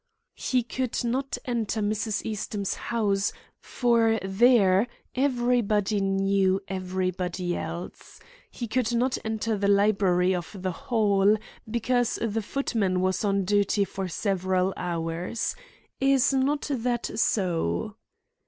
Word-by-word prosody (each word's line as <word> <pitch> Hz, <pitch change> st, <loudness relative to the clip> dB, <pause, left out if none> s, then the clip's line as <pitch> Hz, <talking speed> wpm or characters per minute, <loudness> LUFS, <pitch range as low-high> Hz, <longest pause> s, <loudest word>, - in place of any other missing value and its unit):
"He 250 Hz, -2 st, +1 dB
could 255 Hz, +1 st, -2 dB
not 265 Hz, +3 st, -1 dB
enter 230 Hz, -3 st, -1 dB
Mrs. 215 Hz, 0 st, -1 dB
Eastham's 205 Hz, -2 st, -3 dB
house, 205 Hz, -4 st, 0 dB, 0.3 s
for 230 Hz, -2 st, +2 dB
there 195 Hz, 0 st, +4 dB, 0.3 s
everybody 240 Hz, -6 st, +1 dB
knew 195 Hz, 0 st, +2 dB
everybody 185 Hz, -1 st, -2 dB
else. 170 Hz, +2 st, -7 dB, 0.3 s
He 240 Hz, -, -6 dB
could 240 Hz, 0 st, 0 dB
not 250 Hz, +2 st, +1 dB
enter 220 Hz, 0 st, -1 dB
the 200 Hz, -, +1 dB
library 195 Hz, -3 st, +3 dB
of 180 Hz, +2 st, -5 dB
the 185 Hz, 0 st, -2 dB
Hall, 205 Hz, +1 st, +2 dB, 0.3 s
because 240 Hz, +1 st, +1 dB
the 225 Hz, -1 st, -1 dB
footman 205 Hz, -6 st, -1 dB
was 185 Hz, +1 st, 0 dB
on 200 Hz, -2 st, +1 dB
duty 205 Hz, +1 st, +2 dB
for 190 Hz, -1 st, -4 dB
several 185 Hz, 0 st, 0 dB
hours. 170 Hz, +3 st, -3 dB, 0.4 s
Is 270 Hz, 0 st, +3 dB
not 275 Hz, +3 st, +1 dB
that 240 Hz, -3 st, -1 dB
so?" 200 Hz, +2 st, 0 dB
205 Hz, 115 wpm, -26 LUFS, 190-235 Hz, 0.4 s, there